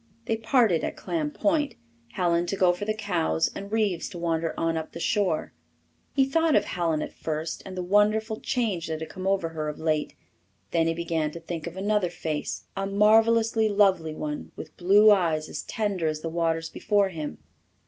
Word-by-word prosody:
They 225 - 0
parted 225 - +2
at - - -3
Clam 315 -3 -2
Point, 300 -1 0 0.4
Helen 175 -1 +1
to 195 - -1
go 185 -2 +4
for 180 +4 -5
the 215 - 0
cows 80 - 0
and 200 +1 -7
Reeves 210 -6 0
to - - -9
wander 165 -1 -1
on 165 0 0
up 160 -1 -4
the - - -7
shore. 190 -3 0 0.6
He 270 -2 +4
thought 320 +3 +2
of - - +3
Helen 165 -3 -1
at - - -7
first, 155 +1 -4
and 185 -1 -8
the 180 - -2
wonderful 215 +3 +2
change 205 -9 -1
that 160 -1 -3
had 160 0 -6
come 185 +2 -5
over 195 -4 +1
her 155 -2 -3
of 150 - -6
late; 155 -2 -1 0.6
then 165 -1 +2
he 165 - 0
began 165 -2 -1
to 170 - -7
think 165 -1 -6
of 170 +2 -7
another 205 -1 +1
face 150 - -4
a 195 0 -2
marvellously 220 +2 +4
lovely 190 -6 +2
one 150 -1 -5
with - - -9
blue 205 +4 +6
eyes 165 -6 +2
as - - -4
tender 200 -7 -2
as 155 0 -2
the 165 - -3
waters 165 -1 0
before 205 -2 +1
him. 155 -4 -5
180 Hz, 195 wpm, -26 LUFS, 165-210 Hz, 0.6 s, blue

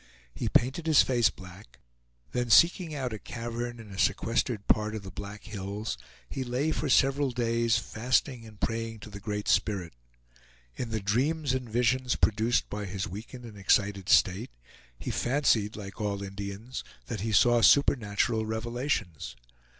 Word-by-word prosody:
He 95 - -2
painted 135 +10 +1
his 155 -2 +6
face 120 -4 +3
black; 95 +1 -13 0.5
then 120 -1 -1
seeking 170 - +5
out 130 -5 -3
a 110 - -5
cavern 120 +3 -5
in 110 -3 -11
a 95 - -7
sequestered 115 0 0
part 105 0 +2
of 105 - -6
the 95 - -8
Black 100 +2 -8
Hills, 105 - -4 0.3
he 130 - -4
lay 130 +5 -1
for 150 - -2
several 135 +1 +3
days, 115 -1 +1
fasting 125 +1 0
and 110 -2 -14
praying 115 -1 -3
to 105 - -10
the 100 - -8
Great 105 +1 -4
Spirit. 95 -6 +1 0.8
In 120 - -4
the 110 -1 -2
dreams 135 +8 +1
and 130 -2 -3
visions 125 +2 +1
produced 110 +3 +2
by 105 -1 -5
his 95 0 -3
weakened 115 +7 -9
and 105 -3 -10
excited 100 0 +1
state, 100 +7 +4 0.5
he - - -4
fancied 120 -5 +1
like 100 0 -8
all 100 -1 -2
Indians, 100 +5 -6 0.2
that 110 -6 -5
he 110 +1 -2
saw 120 +3 +5
supernatural 115 -4 +3
revelations. 110 - -3
115 Hz, 160 wpm, -29 LUFS, 100-125 Hz, 0.8 s, his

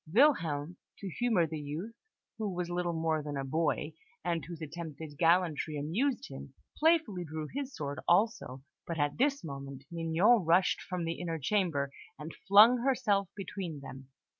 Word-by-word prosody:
Wilhelm, 170 - +3 0.2
to 195 - -6
humour 225 -5 +2
the 160 -1 -5
youth, 155 +10 -5 0.5
who 215 -2 -1
was 175 -1 -3
little 175 -1 -1
more 160 -1 +1
than 145 -1 -5
a 135 - -3
boy, 155 +2 0 0.3
and 170 -2 0
whose 170 -1 -8
attempted 155 -1 -7
gallantry 165 -3 +2
amused 220 - -1
him, 135 0 -10 0.2
playfully 310 - +3
drew 155 -1 -5
his 275 0 -4
sword 145 -2 -4
also; 190 - +1 0.2
but 170 - -3
at 145 +4 0
this 280 +1 +2
moment, 140 -3 -7
Mignon 170 +7 +3
rushed 170 +3 +3
from 180 -2 -4
the 165 0 -3
inner 165 -2 -2
chamber, 155 -4 0 0.3
and 150 +3 -7
flung 215 +5 +8
herself 210 -7 +1
between 185 -6 -5
them. 135 -1 -10
170 Hz, 160 wpm, -31 LUFS, 150-200 Hz, 0.5 s, flung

